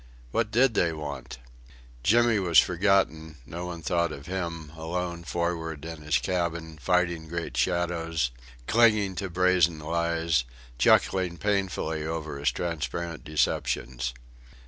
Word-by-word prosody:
What 110 - +1
did 120 +2 +4
they 85 -5 +2
want? 70 -6 -6 0.6
Jimmy 115 - +4
was 85 -4 +2
forgotten; 85 -4 +3
no 85 +6 -6
one 85 -2 -7
thought 85 0 +1
of 70 -1 -8
him, 85 -3 -4
alone 85 +1 -3
forward 80 -2 -2
in 80 -2 -7
his 75 0 +2
cabin, 85 -3 -2
fighting 85 -2 +1
great 85 -6 -4
shadows, 80 -1 0 0.3
clinging 110 - +4
to 95 - -3
brazen 90 -2 +3
lies, 85 -2 0 0.4
chuckling 90 +7 +3
painfully 90 -4 -1
over 80 -2 -4
his 70 - +2
transparent 85 0 -3
deceptions. 60 -4 -1
85 Hz, 125 wpm, -27 LUFS, 80-90 Hz, 0.6 s, did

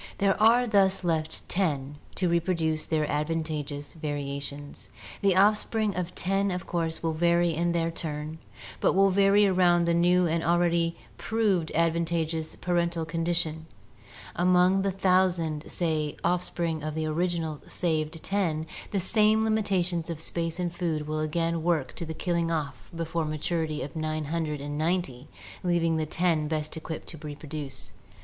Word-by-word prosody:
There 200 0 +2
are 235 +3 +6
thus 195 -4 +3
left 160 -2 -1
ten 145 -6 0 0.2
to 180 - 0
reproduce 170 -2 0
their 155 -2 +1
advantageous 150 -1 -3
variations. 145 -2 -5 0.3
The 195 -3 +3
off 205 +3 +6
spring 215 -2 -1
of 180 -1 -1
the - - -15
ten 195 +2 +1
of 180 -1 -3
course 165 -2 -2
will 165 -1 0
vary 170 +1 +2
in 170 +2 0
their 165 -1 0
turn, 155 -1 -5 0.4
but - - +3
will 195 +1 +4
vary 200 +2 +5
around 180 -3 +4
the 170 - +2
new 175 +1 +4
and 165 0 0
already 170 -1 +2 0.2
proved 205 -7 +1
advantageous 165 -1 0
parental 170 -2 0
condi 165 +1 -1
tion: 160 -1 -2 0.7
among 180 +2 +4
the 195 - +1
thousand, 180 -5 +1
say, 155 -4 -1
offspring 170 -2 0
of 155 0 -4
the 160 0 -1
original 160 -1 -1
saved 160 -2 -1
ten 170 -6 0 0.2
the 200 - -1
same 215 +3 +3
limitations 185 -6 0
of 165 -2 -4
space 165 +1 0
and 175 -1 -2
food 165 -4 -2
will 155 0 -2
again 165 +2 0
work 160 -5 0
to 170 - -4
the 160 - -5
killing 170 0 0
off 155 -4 -3
before 165 0 -2
maturity 155 0 -2
of 140 +3 -8
nine 155 -1 -2
hundred 155 -2 -2
and 145 +1 -4
ninety, 155 -6 -1 0.4
leaving 170 -2 +2
the 155 -1 -1
ten 165 -2 +1
best 155 0 -2
equipped 160 0 -6
to 165 - -9
reproduce. 150 -2 -7
165 Hz, 155 wpm, -27 LUFS, 155-180 Hz, 0.7 s, are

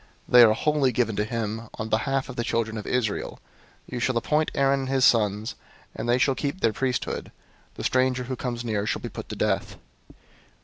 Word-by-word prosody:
They 125 - +8
are 110 -2 +8
wholly 150 -1 +2
given 115 -3 0
to 105 - +2
him 115 0 -4
on 110 - -4
the 110 - +3
behalf 135 +2 -1
of 125 - -8
the 120 - -1
children 115 -1 -1
of 105 - -6
Israel. 120 -5 -1 0.5
003:010 - - -13
You 125 - -2
shall 125 0 +1
appoint 150 +6 +1
Aaron 140 0 +3
and 135 -1 -4
his 135 -1 +3
sons, 105 -2 +2 0.4
and 120 - -4
they 120 - +4
shall 135 +2 +3
keep 145 +6 -3
their 110 - +2
priesthood. 130 0 -2 0.4
The - - -6
stranger 130 0 +1
who 130 +1 -4
comes 120 -1 -4
near 105 -2 -1
shall - - -1
be - - -4
put - - -8
to - - -5
death." - - -1
125 Hz, 215 wpm, -25 LUFS, 110-130 Hz, 0.5 s, They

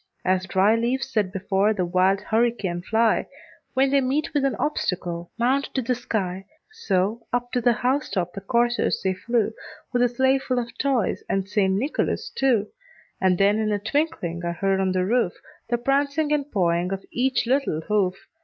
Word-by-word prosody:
As 185 0 +1
dry 190 +3 +3
leaves 255 +3 -1
that 205 -4 +1
before 195 +2 +1
the 185 -3 0
wild 185 +2 +2
hurricane 220 -6 0
fly, 220 +4 +2 0.5
When 265 +1 +3
they 280 -1 +4
meet 290 +5 -1
with 290 -2 +1
an 275 - +1
obstacle, 175 - -2
mount 260 +4 +2
to 265 - +1
the 250 +2 +1
sky, 195 -6 -3 0.2
So, 220 - -1
up 245 0 -1
to 245 - 0
the 240 +1 +4
house 260 +5 0
top 180 -3 -2
the 195 - -6
coursers 240 +3 +1
they 190 -1 +1
flew, 225 +3 0 0.4
With 245 - +2
a 245 - +4
sleigh 265 +2 +2
full 255 -1 -2
of 240 -1 -3
toys 265 -5 0
and 195 0 0
St. 200 -2 +1
Nicholas 305 - -1
too. 245 -6 +1 0.5
And 185 -1 +3
then 200 +3 +3
in 215 -1 0
a 205 - +1
twinkling 205 - -2
I 170 0 -1
heard 195 +2 0
on 190 -1 +1
the 185 0 +1
roof, 230 -3 +1 0.4
The 240 - +2
prancing 280 +4 +1
and 295 -1 -1
pawing 175 -2 +1
of 195 0 -4
each 255 -1 +1
little 255 - 0
hoof. 195 0 +1
220 Hz, 185 wpm, -24 LUFS, 190-260 Hz, 0.5 s, they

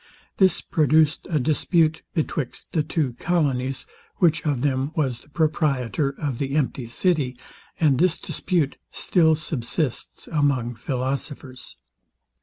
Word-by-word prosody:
This 190 -2 +4
produced 155 0 +2
a 155 -4 +2
dispute 160 +3 +2
betwixt 150 -4 -3
the 160 - +2
two 150 -4 -1
colonies, 135 -6 0 0.3
which 170 -3 +3
of 140 -5 0
them 135 0 0
was 130 -7 0
the 145 - -21
proprietor 145 -3 0
of 140 -6 -2
the 135 0 -2
empty 135 -4 0
city 135 -1 0 0.4
and 145 -5 +3
this 180 -1 +3
dispute 160 -6 -1
still 160 -3 +3
subsists 150 -2 -2
among 140 -6 +1
philosophers. 130 +2 -4
145 Hz, 120 wpm, -24 LUFS, 130-160 Hz, 0.4 s, This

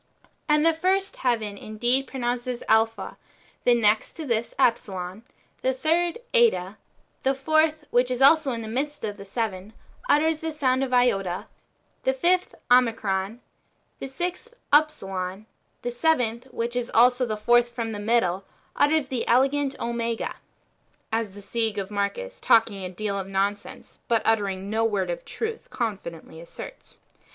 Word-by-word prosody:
And 300 +1 +4
the 330 - +5
first 380 +4 0
heaven 220 -5 -1
indeed 240 +5 0
pronounces 245 -1 -3
A - - -15
JpJia^ 225 +1 +1 0.5
the 245 - +6
next 215 -2 +2
to 320 - -7
this 235 -3 -1
Epsilon, 195 -6 0 0.4
the 260 0 +1
third 330 - +1 0.2
Eta, 220 - +3 0.4
the 270 +1 +1
fourth, 310 +2 +1
which 245 +1 +3
is 250 -1 -2
also 280 +1 +5
in 230 -2 -4
the - - -6
midst 290 +5 -3
of 210 -2 -3
the 200 - -10
seven, 200 -1 -4 0.4
utters 315 +1 +3
the 320 0 -3
sound 265 -3 +1
of 265 - -3
Iota, 195 -8 +2 0.6
the 265 - +1
fifth 360 +7 +1 0.2
Omicron, 225 -3 +2 0.6
the - - -5
sixth 360 - -5 0.2
Upsilon, 195 -10 +1 0.4
the 245 - -2
seventh, 245 -4 +1
which 240 -2 -4
is 245 -1 -1
also 245 +2 +5
the 215 -1 -2
fourth 240 +3 +4
from 230 -2 -4
the 210 - -5
middle, 205 -4 +1 0.3
utters 300 0 +3
the 255 -3 -3
element 275 +3 +2
Omega, 235 -1 -2
^ - - -4 0.4
— - - -41
as 225 -3 -1
the 205 - -11
Sige 220 0 -1
of 200 0 -3
Marcus, 210 - -3
talking 220 -4 +3
a 185 - -4
deal 200 +2 -3
of 190 - -5
nonsense, 195 +1 -3
but 230 -2 +2
uttering 200 -3 0
no 220 +2 0
word 200 -5 0
of 170 - -5
truth, 450 0 -5
confidently 170 -8 -5
asserts. 170 - -11
235 Hz, 160 wpm, -25 LUFS, 205-275 Hz, 0.6 s, the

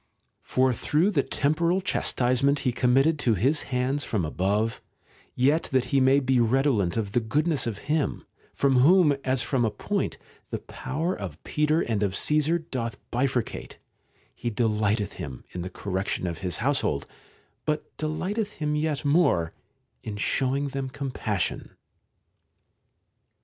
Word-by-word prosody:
For 130 0 +2
though 160 - +1
the 150 -8 +2
temporal 165 +7 +1
chastisement 140 -5 +1
be 125 - +2
committed 135 +6 +3
to 115 -6 +2
his 135 - +2
hands 130 +3 0
from 100 -7 -1
above, 100 +8 0 0.5
yet 145 +6 +3
that 130 -2 +2
he 135 - +5
may 135 +2 +5
be 130 -2 +2
redolent 115 -5 +2
of 105 -3 -2
the 120 - +2
goodness 145 +6 0
of 110 -4 -3
Him, 150 -1 0 0.3
from 135 -2 +2
whom, 155 +2 +6
as 130 -2 +1
from 130 -1 0
a 115 - +2
point, 105 - -2 0.3
the - - -2
power 165 +6 -3
of 90 -6 -7
Peter 150 +2 +1
and 110 -3 -1
of 100 -2 0
Caesar 155 +6 +2
doth 125 -9 -4
bifurcate, 125 -1 -1 0.6
he 120 - -3
delighteth 105 -2 0
him 70 -8 -7
in 90 - -5
the 90 - -4
correction 95 0 -3
of 85 -2 -3
his 90 -3 -2
household, 120 - 0 0.6
but 155 -1 -3
deliehteth 195 +8 -2
him 150 -1 -2
yet 150 -1 -1
more 140 - +3 0.5
in 105 -2 -6
showing 135 +5 0
them 135 -1 -3
compassion. 130 - -3
130 Hz, 145 wpm, -26 LUFS, 110-150 Hz, 0.6 s, whom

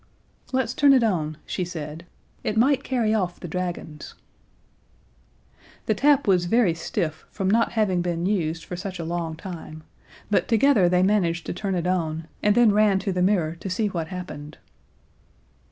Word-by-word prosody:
"Let's 260 -2 0
turn 280 -1 +5
it 255 -3 +4
on," 155 -8 0
she 185 - -3
said. 165 -1 -7 0.4
"It 215 - -2
might 270 +3 +3
carry 235 -5 0
off 185 -5 -1
the - - -7
dragons." 170 -3 -5 1.7
The - - +2
tap 285 0 +3
was 180 -3 +3
very 215 -2 +3
stiff 165 -1 -4
from 195 -2 -3
not 230 +4 +2
having 200 -6 +1
been 175 -1 -2
used 165 -5 -1
for 180 - -6
such 185 +1 -6
a 170 - -5
long 165 -1 -3
time, 160 -3 -9 0.5
but 205 - +2
together 225 -5 +4
they 180 +1 +3
managed 180 -4 +1
to - - -3
turn 195 +1 -2
it 175 -1 -2
on, 165 -3 -1
and 210 0 +3
then 240 -3 +6
ran 210 -2 +4
to 195 +1 -2
the 180 - -1
mirror 180 -4 +1
to 195 - -5
see 205 +3 0
what 170 -4 -3
happened. 155 -5 -8
180 Hz, 170 wpm, -24 LUFS, 170-215 Hz, 1.7 s, then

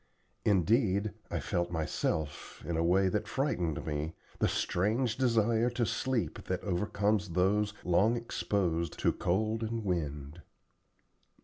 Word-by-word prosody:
Indeed, 100 - +2 0.2
I - - -2
felt 85 0 -1
myself, 80 -2 -2
in 85 - -2
a 80 - +1
way 95 +3 +4
that 105 +3 -1
frightened 90 - -1
me, 75 +1 -3 0.2
the - - +3
strange 110 +6 0
desire 115 -2 +2
to 120 -1 0
sleep 130 0 -1
that 90 -1 -2
overcomes 105 +1 0
those 100 +4 +1
long 100 +7 +3
exposed 90 -7 -1
to - - +2
cold 110 +5 0
and 115 -1 -3
wind. 75 -3 -3
100 Hz, 125 wpm, -31 LUFS, 85-110 Hz, 0.2 s, way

